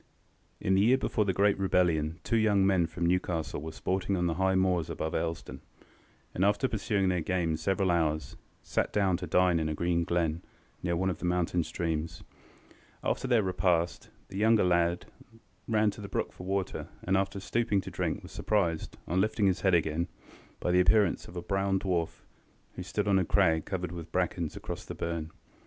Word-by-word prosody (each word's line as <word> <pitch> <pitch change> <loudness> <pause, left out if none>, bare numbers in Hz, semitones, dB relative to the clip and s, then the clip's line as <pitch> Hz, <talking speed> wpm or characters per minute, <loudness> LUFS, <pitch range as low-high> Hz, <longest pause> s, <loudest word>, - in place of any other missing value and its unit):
In 95 - +1
the 95 - +4
year 120 +5 +5
before 110 -4 0
the 95 - +2
great 100 +1 +2
rebellion 85 -4 +1
two 115 - +1
young 105 -3 +3
men 95 -4 +3
from 85 +1 -3
Newcastle 85 -4 -1
were 80 +1 -5
sporting 95 +2 -1
on 90 - 0
the 85 - +1
high 95 +2 +1
moors 90 -3 +1
above 80 - -3
Elsdon, 80 0 -3 0.7
and, 90 - 0
after 105 +6 +3
pursuing 100 -4 0
their 90 -2 +1
game 85 -2 0
several 95 +3 +1
hours, 80 -2 0 0.3
sat - - -1
down 100 -3 +2
to 90 0 -6
dine 90 -2 +3
in 80 -1 -1
a 75 - -2
green 85 +1 +1
glen, 85 -1 0 0.4
near 85 -1 0
one 95 +2 +1
of 85 - -6
the - - -4
mountain 90 -1 +1
streams. 80 -1 -3 0.8
After - - -1
their 120 -4 +3
repast, 90 -2 0 0.2
the 95 - -5
younger 110 0 +4
lad 85 -1 +2 0.6
ran 110 -2 +3
to 105 - -11
the 100 - -7
brook - - -2
for 90 - -9
water, 95 -1 -2 0.2
and, 95 - +1
after 95 +1 0
stooping 105 0 0
to - - -8
drink, - - -2
was - - -11
surprised, 85 -7 -1
on 90 +3 +1
lifting 105 0 +1
his 95 -2 +2
head 95 -2 +4
again, 80 +1 0 0.5
by 90 - 0
the 90 - +4
appearance 90 +1 +3
of 85 - -12
a 90 - -4
brown 95 0 0
dwarf, 90 -4 -2 0.5
who - - -7
stood 105 +3 -2
on 100 -1 +4
a - - +2
crag 80 -3 +2
covered 90 -3 -3
with 85 -1 -8
brackens 90 -3 -1
across - - -6
the - - -7
burn. 85 -2 -3
90 Hz, 195 wpm, -29 LUFS, 85-95 Hz, 0.8 s, year